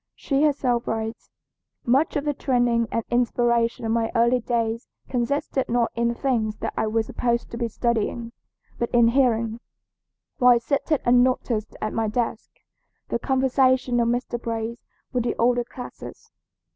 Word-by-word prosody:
She 275 -1 -1
herself 265 -5 +1
writes: 225 0 -4 0.6
"Much 270 +6 +2
of 290 0 -1
the 295 - +1
training 245 -4 +1
and 230 - -1
inspiration 235 -1 +1
of 225 - 0
my 225 0 0
early 235 +2 +3
days 230 0 -2 0.2
consisted 265 +2 -1
not 235 0 +1
in 235 0 0
the 235 - 0
things 230 -5 0
that - - -4
I 220 - 0
was 220 +1 0
supposed 235 +1 -1
to 235 - -5
be 235 -1 -1
studying, 230 0 -1 0.5
but 235 - -1
in 235 -1 +6
hearing, 230 -3 +1 0.8
while 245 -2 +6
seated 280 +4 0
unnoticed 245 -3 +2
at 215 - -2
my 225 -1 0
desk, 225 0 -2 0.6
the 235 - -1
conversation 260 -1 +2
of 235 - +2
Mr. 240 0 -2
Brace 230 0 -4 0.3
with 250 -2 +1
the 240 - -1
older 245 +1 +2
classes. 245 +1 -10
235 Hz, 155 wpm, -24 LUFS, 230-250 Hz, 0.8 s, in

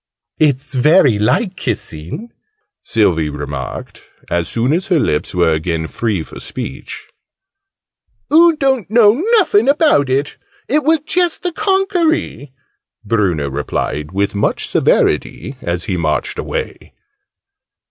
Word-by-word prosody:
"It's 140 -2 +1
very 135 - +4
like 185 - +1
kissing!" 105 - -4 0.5
Sylvie 85 -9 +1
remarked, 70 -3 -6 0.3
as 85 -1 0
soon 120 +5 0
as 180 +3 -1
her 180 - +2
lips 75 - -1
were 85 -2 +3
again 80 +1 -2
free 105 -3 -2
for - - -11
speech. - - -7 1.3
"Oo 335 +1 +6
don't 265 - 0
know 230 - +4
nuffin 250 - +3
about 285 - +3
it! 140 +3 -1 0.3
It 300 +1 +1
were 320 +3 +3
just 350 0 0
the 360 - -1
conkery!" 365 - 0 0.5
Bruno 95 -9 0
replied 75 +2 -3
with 100 +1 -1
much 100 - 0
severity, 135 - 0
as 85 +1 -3
he 95 - -2
marched 80 -3 -2
away. - - -5
130 Hz, 120 wpm, -16 LUFS, -, 1.3 s, Oo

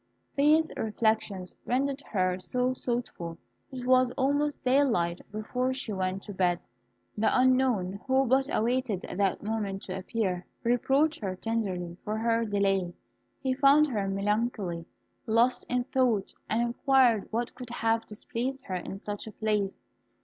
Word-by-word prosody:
These 305 +3 +4
reflections 215 -4 0
rendered 275 +3 0
her 185 -3 +1
so 250 +7 0
thoughtful 235 -10 -3 0.3
that 260 -2 -7
it - - -7
was 255 0 +5
almost 285 +2 +1
daylight 245 -11 +2
before 250 +5 -1
she 250 -5 -3
went 190 0 -2
to 205 - -7
bed. 180 -2 +1 0.6
The 220 +1 +2
unknown, 250 -7 +2
who 265 +1 +3
but 265 +2 +2
awaited 235 -4 0
that 195 +1 -1
moment 205 -3 -2
to 185 - -5
appear, 190 -3 -2 0.2
reproached 270 +6 +2
her 190 -3 -2
tenderly 185 -5 -2
for 215 +1 -2
her 230 +1 +1
delay. 195 -4 +1 0.5
He 260 -1 +1
found 280 +3 +6
her 205 -6 -1
melancholy, 195 -3 -1 0.4
lost 230 +3 +3
in 250 0 +1
thought, 245 -6 +1 0.2
and 225 +2 +2
inquired 240 -2 +3
what 235 +2 -2
could 250 -2 -9
have 225 -1 0
displeased 250 +5 -4
her 185 - -3
in 185 +2 -6
such 205 +1 -5
a - - -6
place. 210 -2 -1
225 Hz, 145 wpm, -29 LUFS, 195-255 Hz, 0.6 s, found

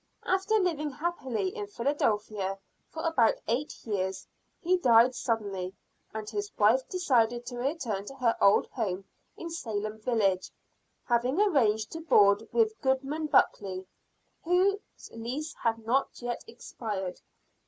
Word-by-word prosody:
After 385 +3 +1
living 335 -7 +1
happily 265 - -2
in 205 - -4
Philadelphia 210 -5 -1 0.3
for 320 - -6
about 255 -9 +3
eight 250 +6 -2
years 190 -3 -2 0.3
he 365 +2 +2
died 245 -5 +5
suddenly, 200 -7 -2 0.4
and 215 -1 -6
his 410 - -4
wife 220 +5 +5
decided 245 - +1
to 245 0 -6
return 245 -8 -2
to 275 - -9
her 245 -4 +2
old 200 +1 +5
home 195 -5 -3 0.3
in 335 -1 -6
Salem 215 -8 -4
village, 215 -5 +1 0.6
having 245 +6 +1
arranged 230 - +2
to 325 - -6
board 210 -8 +4
with 440 -2 +1
Goodman 275 +3 0
Buckley, 195 -9 +2 0.6
whose 370 +4 +3 0.3
lease 260 +8 -4
had 225 -1 -1
not 260 +4 +2
yet 240 -1 -4
expired. 205 - -5
240 Hz, 130 wpm, -29 LUFS, 210-305 Hz, 0.6 s, died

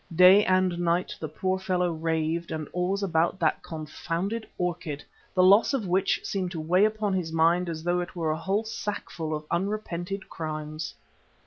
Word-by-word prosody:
Day 185 +4 +8
and 185 -2 +2
night 175 +1 0
the 155 - -3
poor 185 +5 -1
fellow 180 -2 0
raved 160 +1 -1
and 155 -2 -3
always 185 +3 0
about 170 -1 +1
that 160 -2 +1
confounded 170 +7 -4
orchid, 175 -5 -3 0.3
the 185 - +5
loss 200 +8 +6
of 235 -6 -2
which 185 +1 +2
seemed 190 -2 -2
to 165 - -4
weigh 180 +6 +3
upon 215 -2 0
his 180 -4 -1
mind 170 +2 +3
as 160 -1 -5
though 175 +1 +1
it 175 0 -5
were 165 -3 0
a - - 0
whole 195 +6 -1
sackful 205 -7 -4
of 150 0 -6
unrepented 190 0 -2
crimes. 155 -1 -5
175 Hz, 175 wpm, -27 LUFS, 160-190 Hz, 0.3 s, Day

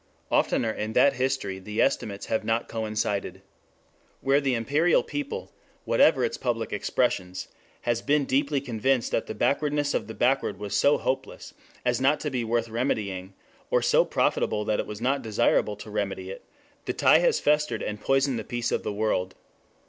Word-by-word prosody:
Oftener 115 - +2
in 110 0 -4
that 135 +4 +5
history 120 -7 -2
the 105 +3 -6
estimates 100 -1 0
have 110 - -1
not 115 +2 0
coincided. 105 -4 -3 0.8
Where 135 +2 +3
the 135 -3 +1
imperial 145 +9 +2
people, 145 -1 -5 0.3
whatever - - +4
its - - -3
public 115 -3 -2
expressions, 95 -4 -1 0.3
has 120 -1 0
been 145 +1 +2
deeply 140 +1 +1
convinced 125 0 0
that - - -1
the 110 - -5
backwardness 145 0 +1
of - - -1
the 110 - -8
backward 125 -5 +1
was 105 0 -4
so 145 - +4
hopeless 130 - -4 0.3
as 125 0 +1
not 140 +3 +3
to 150 - -2
be 125 -2 -1
worth 115 0 0
remedying, 100 -6 -2 0.3
or - - +2
so - - +4
profitable 105 -1 0
that 105 - 0
it - - -2
was 105 +1 -7
not 135 +3 +1
desirable 110 -2 +1
to 105 +1 -10
remedy 95 -2 -3
it, 95 - -9 0.4
the - - -1
tie - - +5
has - - +2
festered 150 -6 +1
and 105 0 -4
poisoned 135 -1 +1
the - - -5
peace 120 0 -3
of - - 0
the - - -3
world. 100 -3 -1
115 Hz, 175 wpm, -26 LUFS, 105-135 Hz, 0.8 s, that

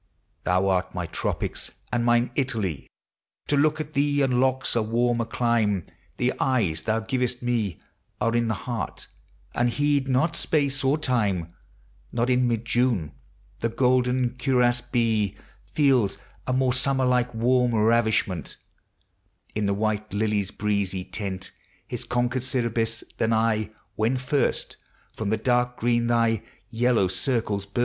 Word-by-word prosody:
Thou 90 +1 +2
art 95 -1 0
my 90 -1 -2
tropics 80 - -3 0.2
and 120 -1 +1
mine 120 +1 +3
Italy; 110 - -2 0.6
To 145 - +1
look 155 +2 +3
at 155 0 -5
thee 145 0 +2
unlocks 130 0 +2
a 115 - +3
warmer 115 +1 +1
clime;. 110 -7 +1 0.3
The 125 +1 +1
eyes 100 -12 +1
thou 110 +3 0
givest 125 +1 -2
me 110 -9 -1 0.4
Are 115 0 +1
in 120 -1 +2
the 110 - 0
heart, 115 - -4 0.5
and 120 0 +2
heed 145 +1 +1
not 135 +5 +2
space 140 -3 +1
or 135 +3 +3
time: 100 - 0 0.6
Not 120 +1 +1
in 125 0 +3
mid 115 -1 -1
June 115 - +1 0.5
the 115 - 0
golden 125 +1 +2
cuirassed 120 -2 +1
bee 110 -5 +1 0.3
Feels 130 -9 +3 0.3
a 125 - +1
more 130 -1 +2
summer 130 +1 +1
like 125 -1 +2
warm 125 +1 +2
ravishment 110 -6 +1 1.0
In 105 -1 0
the 100 - +2
white 110 0 -1
lily's 105 -2 0
breezy 100 -3 -1
tent, 95 -2 -5 0.4
His - - -5
conquered 125 +1 0
Sybaris, 115 -3 -1 0.2
than 115 - +2
I, 110 -1 +1 0.3
when 115 +4 +1
first 130 +2 -1 0.4
From, 110 -2 -2
the 110 - +1
dark 125 +2 +1
green 120 0 +1
thv 115 -2 +2 0.3
vellow 115 -4 +3
circles 100 -1 -1
burst. 100 +4 -4
120 Hz, 140 wpm, -25 LUFS, 105-125 Hz, 1.0 s, mine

